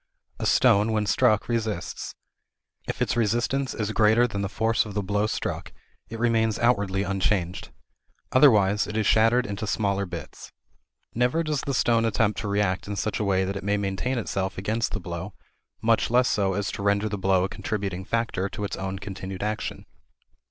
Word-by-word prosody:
A - - -1
stone 105 +3 +4
when 105 -1 +1
struck 110 +1 +2
resists. 110 -6 -3 0.7
If - - -1
its - - -1
resistance 120 +4 0
is 105 -1 -2
greater 110 +2 +4
than 100 -5 -3
the 100 - -2
force 110 +2 +1
of 105 -2 -9
the 105 - 0
blow 105 +2 0
struck, - - -4 0.4
it 115 - -6
remains 115 -2 +1
outwardly 100 -5 +1
unchanged. 95 -2 -1 0.6
Otherwise, 105 -7 +5
it 105 - -4
is 110 - +1
shattered 115 +4 +4
into 100 +2 -4
smaller 100 -1 0
bits. 85 -1 -9 0.6
Never 125 +8 +1
does 150 -4 -1
the 140 - -2
stone 115 -2 +3
attempt 110 -1 +1
to 105 - -4
react 100 -2 0
in 105 - -3
such 110 0 -2
a - - 0
way 95 -2 +1
that 95 +1 -3
it 100 - -5
may 100 +1 +1
maintain 100 +6 -2
itself 95 -4 -2
against 110 +4 -1
the - - -1
blow, 95 +2 -6 0.5
much 115 0 +2
less 125 +1 +4
so 95 -2 +1
as 100 +2 -2
to - - -6
render 100 +1 +1
the 105 -1 -4
blow 95 -1 +2
a - - +1
contributing 95 -3 -4
factor 105 -3 -1
to 105 - -6
its 100 - -3
own 95 0 -4
continued 95 -1 -6
action. 105 0 -3
105 Hz, 185 wpm, -25 LUFS, 95-115 Hz, 0.7 s, Otherwise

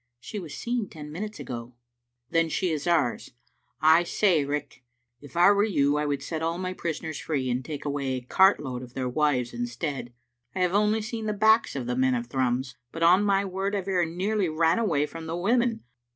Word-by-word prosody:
" 120 0 -55
She 210 - -6
was 165 -6 -8
seen 240 -4 -2
ten 150 -2 -9
minutes 210 +6 -6
ago. 120 -1 -7 0.3
" 120 0 -55
"Then 165 -1 +2
she 180 +1 0
is 155 +1 -3
ours. 155 -9 +1 0.5
I 160 +2 +6
say, 175 -3 +2
Riach, 145 -1 -4 0.4
if 145 +3 -11
I 180 +3 +7
were 200 0 +3
you 145 -9 +2
I 150 0 0
would 140 -1 -2
set 160 +2 -4
all 165 +1 -1
my 185 0 -3
prisoners 160 -3 -4
free 135 -5 -2
and 125 +2 -1
take 150 0 -6
away 140 -2 -1
a 130 - -4
cart 190 +10 +4
load 130 -4 -5
of 125 -1 -11
their 130 -1 -2
wives 125 -2 +1
instead. 120 +2 -4 0.4
I 185 - -1
have 180 0 +2
only 210 +1 +2
seen 225 0 -4
the 210 - 0
backs 220 -1 +3
of 130 -3 -3
the 125 +1 -2
men 130 0 +2
of 120 0 -2
Thrums, 130 +1 -1 0.2
but, 165 - -3
on 180 +4 +6
my 200 -1 +2
word, 195 +2 -2
I 200 - 0
very 180 -2 0
nearly 190 +3 -1
ran 165 +4 +2
away 160 -10 +1
from 165 +1 -8
the 165 +1 -3
women. 235 +5 +1
160 Hz, 220 wpm, -26 LUFS, 135-195 Hz, 0.5 s, I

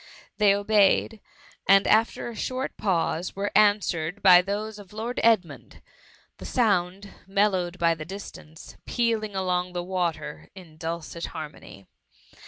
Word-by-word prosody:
They 205 -1 +5
obeyed, 205 +1 +2 0.5
and 195 0 +6
after 225 +2 +2
a 235 - -7
short 255 +4 -4
pause 175 -2 -1
were 200 +1 -2
answered 205 -4 +2
by 180 -2 +8
those 210 +3 -4
of 205 0 -14
Lord 230 +3 -4
Edmund; 220 -7 0 0.6
the - - -9
sound, 200 -4 0 0.2
mellow< 195 -2 +1
ed 175 +1 -11
by 170 -1 +2
the 160 -1 -7
distance, 165 -3 -11
pealing 225 -3 -1
along 180 -1 -1
the 175 -1 -3
water 170 -5 -3
in 175 -5 -13
dulcet 165 +1 -5
harmony. 125 - -10
195 Hz, 135 wpm, -25 LUFS, 175-210 Hz, 0.6 s, by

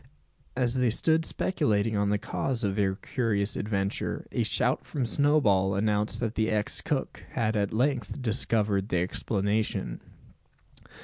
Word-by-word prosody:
As 125 -2 +1
they 125 -2 +2
stood 160 +8 +2
speculating 110 - 0
on 100 0 +1
the 105 - +2
cause 120 +4 -2
of 100 -2 0
their 95 -2 +1
curious 110 -3 -1
adventure, 100 -2 -2
a - - 0
shout - - +1
from 135 -4 -3
Snowball 115 -8 +2
announced 105 +1 +1
that 115 -2 -1
the 110 -1 0
ex 105 -1 0
cook 145 -4 -3
had 110 -3 0
at 100 -1 0
length 135 +5 -1
discovered 110 -4 +1
the 90 - +1
explanation. 100 - -1
110 Hz, 140 wpm, -28 LUFS, 100-125 Hz, -, they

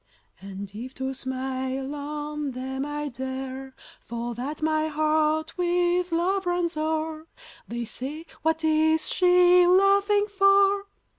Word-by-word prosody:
And 195 0 -8
if 245 +5 -8
to 265 0 -3
smile 260 +1 -4
on 295 -1 -4
them 265 +2 -4
I 295 0 -3
dare, 265 +1 -6 0.2
For 235 +1 -5
that 275 +6 -5
my 310 0 +1
heart 310 0 0
with 355 0 +1
love 365 +3 0
runs 350 -1 0
o'er, 315 0 -2 0.4
They 235 0 -4
say: 275 +8 -7 0.2
"What 320 +1 0
is 315 0 +3
she 360 0 +5
laughing 400 +2 +4
for?" 395 0 +3
310 Hz, 125 wpm, -25 LUFS, 265-350 Hz, 0.4 s, she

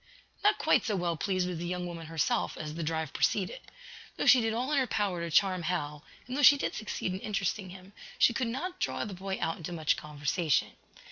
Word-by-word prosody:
Not 415 - +4
quite - - +3
so 215 - -1
well 175 -2 0
pleased 185 +1 0
was 180 -3 -4
the 175 - -4
young 180 0 -3
woman 165 -2 -7
herself, 150 - 0
as 150 -1 -5
the 165 - -5
drive 160 -1 -2
proceeded. - - 0 0.6
Though - - -1
she 255 - +7
did 225 0 0
all 245 +5 -1
in 290 - +3
her 260 - +1
power 200 -6 -1
to 170 - -3
charm 185 +2 +3
Hal, 150 -4 -3 0.2
and 250 - -5
though 290 - 0
she 285 0 +8
did - - -2
succeed 200 -3 -3
in 190 - -4
interesting 195 -1 -2
him, 185 +2 -12 0.2
she 235 - +5
could 250 0 -1
not 355 +11 -4
draw - - -1
the 205 - -6
boy 190 +1 -4
out 165 - -1
into 165 +1 -6
much 160 -3 +1
conversation. 150 +1 0
180 Hz, 225 wpm, -30 LUFS, 165-220 Hz, 0.6 s, she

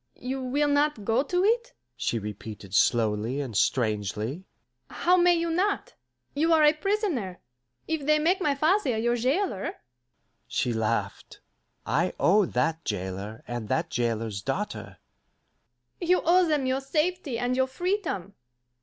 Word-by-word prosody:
"You 260 +2 -4
will 285 +4 +1
not 285 -6 +1
go 225 +4 +2
to 360 +6 0
it?" 475 +4 +1 0.2
she 115 - -1
repeated 105 -2 -7
slowly 110 +4 +2
and 130 -6 -4
strangely. 110 - 0 0.4
"How 360 +1 +2
may 350 -1 +5
you 335 0 -1
not? 395 +5 0 0.4
You 320 +4 +2
are 315 -1 +5
a 300 0 +6
prisoner. 320 - -2 0.5
If 315 -3 -2
they 305 0 +5
make 345 +5 +2
my 290 -5 +1
father 305 - +2
your 240 +2 +1
jailer 260 - -1 0.4
" - - -48 0.3
She 120 - -1
laughed. 110 -3 -2 0.5
"I - - +1
owe 200 +1 +4
that 165 0 -1
jailer 100 +3 -5
and 120 -3 -5
that 165 +1 0
jailer's 115 -4 -1
daughter - - -4 0.5
" 120 - -48
"You 360 +1 +2
owe 355 +2 +5
them 300 -4 +1
your 260 +1 0
safety 305 -1 -1
and 245 +1 0
your 260 0 +2
freedom. 325 - -2
250 Hz, 145 wpm, -27 LUFS, -, 0.5 s, a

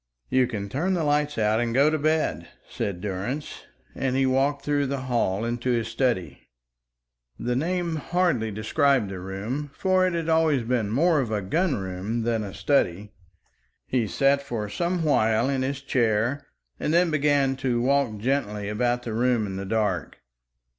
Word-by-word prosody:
"You 130 -1 +3
can 105 -5 -4
turn 160 - -1
the 170 - 0
lights 150 0 +1
out 110 0 +2
and 120 -1 -1
go 140 +3 +5
to 155 - 0
bed," 155 +1 0 0.2
said 95 -3 -4
Durrance, 105 +10 -4 0.3
and 130 -1 -1
he 135 0 +3
walked 135 +2 +1
through 145 -1 +1
the 135 0 -3
hall 115 -5 0
into 120 +2 -2
his 115 -2 0
study. 115 -6 -1 0.9
The 125 0 -2
name 170 +3 -1
hardly 165 -8 0
described 110 +2 +1
the 95 - -5
room, 105 +11 -4
for 185 -1 +2
it 180 - -1
had 165 -1 -2
always 160 -5 +3
been 115 -3 0
more 155 +7 +3
of 125 -5 -1
a 105 -2 -1
gun 165 - +1
room 95 +4 -3
than 115 -1 0
a 100 - -6
study. 100 -1 0 0.7
He 120 -4 0
sat 140 +5 +2
for 115 -6 -4
some 170 - -1
while 115 -5 +2
in 135 -1 0
his 135 +1 -2
chair 120 +2 0 0.3
and 150 - -1
then 170 0 +3
began 145 -3 +2
to 130 -3 0
walk 130 -3 +1
gently 105 -4 -1
about 120 +3 0
the 115 - -4
room 120 -1 +1
in 95 -1 -5
the 95 +1 -4
dark. 105 -5 -1
125 Hz, 175 wpm, -25 LUFS, 110-145 Hz, 0.9 s, go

